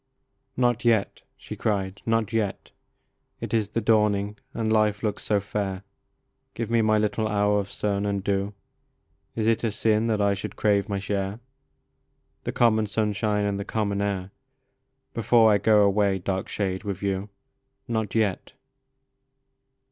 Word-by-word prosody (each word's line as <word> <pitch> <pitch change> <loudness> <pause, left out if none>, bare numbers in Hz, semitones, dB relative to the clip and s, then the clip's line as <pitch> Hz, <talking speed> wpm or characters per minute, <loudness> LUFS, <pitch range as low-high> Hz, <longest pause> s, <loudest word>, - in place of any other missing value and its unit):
OT 120 -2 +2
yet," 110 -4 +1 0.2
she - - -8
cried, 100 -2 -2
"not 115 0 +1
yet! 105 -4 -2 0.7
It - - -5
is 110 -3 +1
the 115 - -1
dawning, 105 -2 +2 0.2
and 110 -1 -1
life 105 -2 +2
looks 105 -2 -1
so 105 -1 +1
fair; 100 -1 -3 0.7
Give 115 -1 -4
me 115 -1 +4
my 110 0 +3
little 105 +1 0
hour 105 -1 +2
of 100 -1 -4
sun 100 -1 -1
and 100 -1 -1
dew. 100 +1 -1 0.8
Is 110 - -1
it 115 +1 +2
a 115 - +1
sin 110 +1 +1
that 110 -2 +1
I 100 -1 +3
should 100 +1 -6
crave 100 0 +1
my 100 - -1
share, 100 +1 -3 1.1
The - - -1
common 110 -3 +3
sunshine 105 0 0
and 100 -1 -1
the - - -2
common 100 -1 -1
air, 100 -2 -2 0.4
/ 135 +1 -50
Before 115 0 +4
I 100 - +4
go 105 0 +5
away, 100 -1 +2
dark 95 +1 -3
shade, 95 -2 -2
with 100 -2 -4
you? 100 +1 -2 0.6
Not 110 -3 -2
yet 105 -4 0
105 Hz, 155 wpm, -25 LUFS, 100-110 Hz, 1.1 s, go